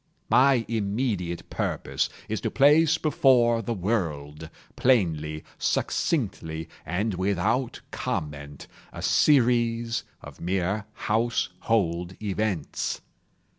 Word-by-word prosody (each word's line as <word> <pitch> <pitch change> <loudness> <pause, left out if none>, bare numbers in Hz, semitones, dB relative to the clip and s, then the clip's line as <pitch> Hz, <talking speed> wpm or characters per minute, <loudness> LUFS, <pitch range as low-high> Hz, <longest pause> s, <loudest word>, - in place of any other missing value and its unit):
My 130 -3 +5
immediate 100 -5 -2
purpose - - -1 0.2
is - - -3
to - - -1
place 150 +3 +5
before 125 -6 +3
the 115 +1 -3
world, 80 -7 -2 0.3
plainly, 80 - +1 0.2
succinctly, 90 - -1 0.2
and 100 +6 -1
without 100 +7 0
comment, 70 -2 -4 0.3
a - - -8
series 120 -4 +3 0.2
of - - -11
mere 95 +4 -1
household 105 -5 0
events. 100 -5 -2
105 Hz, 90 wpm, -26 LUFS, 85-120 Hz, 0.3 s, My